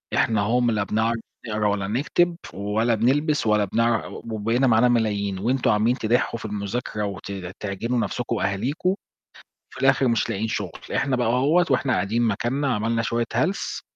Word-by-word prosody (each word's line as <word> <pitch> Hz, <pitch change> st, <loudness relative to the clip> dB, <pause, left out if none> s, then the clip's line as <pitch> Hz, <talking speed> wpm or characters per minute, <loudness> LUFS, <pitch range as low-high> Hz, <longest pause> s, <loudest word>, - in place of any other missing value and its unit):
إحنا 110 Hz, -2 st, +2 dB
أهو 115 Hz, +5 st, +2 dB
م 120 Hz, -1 st, +2 dB
لا 105 Hz, -2 st, 0 dB
بنعرف 110 Hz, +3 st, 0 dB, 0.3 s
نقرا 105 Hz, -1 st, 0 dB
ولا 100 Hz, -1 st, -1 dB
نكتب، 155 Hz, -, +1 dB, 0.2 s
ولا 110 Hz, +4 st, 0 dB
بنلبس 140 Hz, +4 st, +1 dB
ولا 105 Hz, -1 st, +3 dB
بنعر 115 Hz, +3 st, 0 dB, 0.2 s
وبقينا 115 Hz, +5 st, +1 dB
معانا 115 Hz, +1 st, +5 dB
ملايين، 100 Hz, -5 st, 0 dB
وأنتم 125 Hz, +4 st, +1 dB
عمالين 110 Hz, +4 st, +2 dB
تدحُّوا 115 Hz, 0 st, 0 dB
في -, -, -8 dB
المذاكرة 105 Hz, +1 st, -3 dB
وت 100 Hz, 0 st, -6 dB, 0.3 s
تعجنوا 115 Hz, +5 st, -2 dB
نفسكم 120 Hz, +1 st, -2 dB
وأهاليكم، 130 Hz, -, -1 dB, 0.8 s
وفي -, -, -11 dB
الآخر 135 Hz, -1 st, +4 dB
مش 115 Hz, -2 st, +1 dB
لاقيين 110 Hz, +3 st, -2 dB
شغل، 100 Hz, -6 st, -4 dB, 0.2 s
إحنا 135 Hz, -2 st, +1 dB
بقى 120 Hz, -1 st, 0 dB
أهوّة، 145 Hz, +9 st, +3 dB
وإحنا 130 Hz, -, +2 dB
قاعدين 110 Hz, +4 st, 0 dB
مكاننا 120 Hz, +5 st, 0 dB
عملنا 115 Hz, +2 st, 0 dB
شوية 115 Hz, +1 st, -1 dB
هلس 155 Hz, -, -1 dB
115 Hz, 165 wpm, -24 LUFS, 105-125 Hz, 0.8 s, معانا